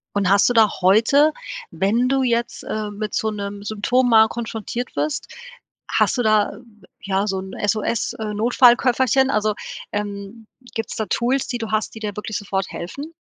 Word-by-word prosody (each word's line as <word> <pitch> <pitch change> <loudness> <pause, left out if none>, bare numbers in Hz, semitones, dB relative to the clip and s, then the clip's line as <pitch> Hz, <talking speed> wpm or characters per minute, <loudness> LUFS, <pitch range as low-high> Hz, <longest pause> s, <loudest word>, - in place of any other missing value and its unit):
Und 200 -2 +1
hast 200 +1 +5
du 245 - +2
da 225 -3 +5
heute, 230 +11 +4 0.4
wenn 225 +6 +1
du 270 +1 +2
jetzt, 235 -1 -1
äh, 215 -1 -4
mit 210 +1 -5
so 220 - 0
'nem 200 -1 -6
Symptom 220 +5 +1
mal 220 -1 +7
konfrontiert 235 +1 -5
wirst, 300 -1 -2 0.6
hast - - +2
du 245 - +1
da, 215 -2 +3 0.5
ja, 195 0 0
so 195 -2 -1
'n 190 0 -8
SOS, 215 +1 0
äh, 215 -1 -3
Notfallköfferchen 250 +3 +4
also, 215 -4 +1 0.4
ähm, 205 +1 -5 0.3
gibt's 225 -2 -4
da 220 - -2
Tools, 250 +7 0
die 245 - -2
du 225 -2 -5
hast, 215 +1 -1
die - - -7
dir 210 -2 -4
wirklich 210 +1 -4
sofort 195 -3 -2
helfen? 280 - -7
220 Hz, 170 wpm, -21 LUFS, 205-240 Hz, 0.6 s, mal